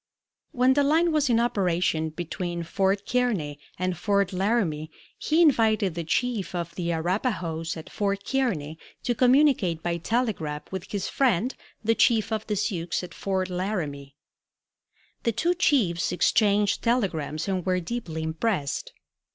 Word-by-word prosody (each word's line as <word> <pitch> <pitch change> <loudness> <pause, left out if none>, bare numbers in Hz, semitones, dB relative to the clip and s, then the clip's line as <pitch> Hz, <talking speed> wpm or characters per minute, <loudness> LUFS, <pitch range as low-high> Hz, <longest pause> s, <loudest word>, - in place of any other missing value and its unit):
When 255 +1 +4
the 285 +1 +3
line 325 +4 +3
was 300 -3 +2
in 230 -1 +4
operation 180 -8 +1
between 175 +1 -4
Fort 195 +4 0
Kearney 205 -13 0 0.2
and 185 0 -1
Fort 200 +1 +1
Laramie 185 -6 0 0.3
he 320 +3 +3
invited 220 - +3
the 170 0 -3
chief 215 +3 -1
of 170 -1 -3
the 170 -1 -2
Arapahoes 170 -2 -1
at 160 - -9
Fort 200 -1 -2
Kearney 170 - -1 0.2
to 245 - +1
communicate 250 - +3
by 170 -1 -1
telegraph 170 -7 -1
with 190 -2 -5
his 200 -2 -2
friend 255 -2 +1 0.3
the 225 +1 +3
chief 225 -1 +3
of 220 -1 -2
the 210 - 0
Sioux 190 -4 -2 0.2
at 175 -1 -8
Fort 190 -1 -2
Laramie. 155 -8 -3 1.1
The 230 - 0
two 335 +11 +1
chiefs 230 - +2
exchanged 200 +2 +2
telegrams 175 - 0
and 190 -2 -1
were 185 0 +1
deeply 170 -5 -4
impressed. 160 -2 -2
195 Hz, 145 wpm, -26 LUFS, 170-235 Hz, 1.1 s, When